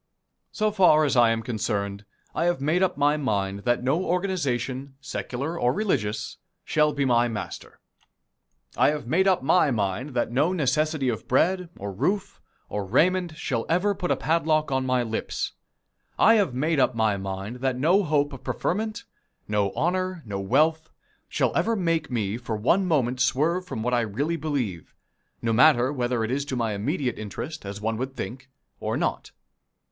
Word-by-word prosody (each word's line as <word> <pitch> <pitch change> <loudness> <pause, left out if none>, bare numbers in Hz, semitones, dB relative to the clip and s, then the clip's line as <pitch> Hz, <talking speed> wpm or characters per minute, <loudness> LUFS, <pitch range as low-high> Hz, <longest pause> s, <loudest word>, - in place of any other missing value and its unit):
So 215 -1 0
far 180 -7 +5
as 140 - +1
I 120 -2 +6
am 115 0 0
concerned, 105 -3 -3 0.3
I 165 - 0
have 175 -4 +1
made 155 +6 +1
up 190 -1 +1
my 145 +1 +3
mind 100 -7 -2
that 120 0 +1
no 145 +8 +1
organization, 140 - -2
secular 140 +4 -4
or 120 - +3
religious, 120 - -1 0.3
shall 150 0 +2
be 140 -1 -1
my 120 -1 +3
master. 110 -3 -7 1.0
I - - +4
have 150 -3 -3
made 175 +10 +2
up 185 -8 +3
my 155 +2 +4
mind 115 +4 -2
that 120 - 0
no 150 +9 +2
necessity 155 -2 +1
of 115 -3 -2
bread, 180 +7 +2
or 100 0 -5
roof, 190 - -2 0.3
or 105 - -3
raiment 170 - +1
shall 120 -9 -2
ever 180 +5 +2
put 190 -2 -4
a - - +3
padlock 155 -2 +1
on 130 -1 0
my 125 -1 +2
lips. 110 -1 -3 0.7
I 225 - +6
have 200 - +2
made 155 +3 +1
up 130 - +2
my 110 -2 +2
mind 95 +4 -5
that 130 0 -1
no 170 +10 +4
hope 145 -4 +1
of 135 - -10
preferment, 220 +4 -2 0.4
no 105 -2 +1
honor, 185 0 -1
no 100 -2 -4
wealth, 155 +10 +2 0.4
shall - - 0
ever 230 - +2
make 165 -5 0
me 110 -4 -1
for 120 -2 -4
one 170 - +2
moment 130 -6 +1
swerve 160 +8 +1
from 110 - -4
what 125 +1 0
I 120 - +3
really 130 +10 -1
believe, 135 - -3 0.5
no 115 -1 +1
matter 130 +1 +5
whether 120 -3 -1
it 110 - -2
is 140 +2 0
to 135 - -3
my 115 -3 -1
immediate 125 - -2
interest, 110 - -6
as 100 +1 -6
one 110 +1 -2
would 130 +2 -4
think, 130 +1 -6 0.3
or - - -2
not. - - -2
135 Hz, 175 wpm, -25 LUFS, 115-165 Hz, 1.0 s, I